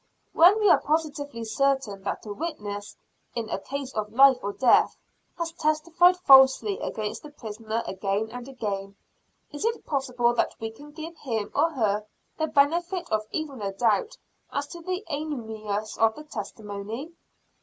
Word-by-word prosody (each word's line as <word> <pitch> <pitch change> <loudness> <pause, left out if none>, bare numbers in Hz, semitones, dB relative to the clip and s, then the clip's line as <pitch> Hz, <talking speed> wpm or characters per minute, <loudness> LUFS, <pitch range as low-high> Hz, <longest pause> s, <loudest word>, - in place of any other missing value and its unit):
When 365 +6 +7
we 420 - +3
are - - +5
positively 290 -5 -2
certain 230 -3 0
that - - -3
a 210 - -5
witness, 205 -9 -5 0.4
in 230 -2 -2
a - - -1
case 275 +4 -5
of 210 -1 -3
life 265 +2 +6
or 200 - -2
death, 245 +3 +4 0.4
has 335 -1 -2
testified 335 +3 +3
falsely 270 +5 +6
against 215 -1 -4
the 300 - -10
prisoner 225 -4 -5
again 200 +3 -2
and 245 +1 -7
again, 200 -6 -4 0.6
is 290 - -6
it 460 +1 -1
possible 250 -4 +1
that 240 - 0
we 225 0 -4
can 290 +7 -13
give 320 +2 -8
him 225 -6 -3
or 330 - +3
her 210 -5 0 0.3
the 315 - +1
benefit 340 +5 +1
of 215 0 0
even 290 -7 -4
a 195 -1 -2
doubt 230 - +1 0.3
as 285 - -1
to 340 - -9
the 370 +4 -3
animus 220 -8 -4
of 225 0 +4
the 300 - -9
testimony? 220 0 -6
265 Hz, 160 wpm, -26 LUFS, 215-310 Hz, 0.6 s, When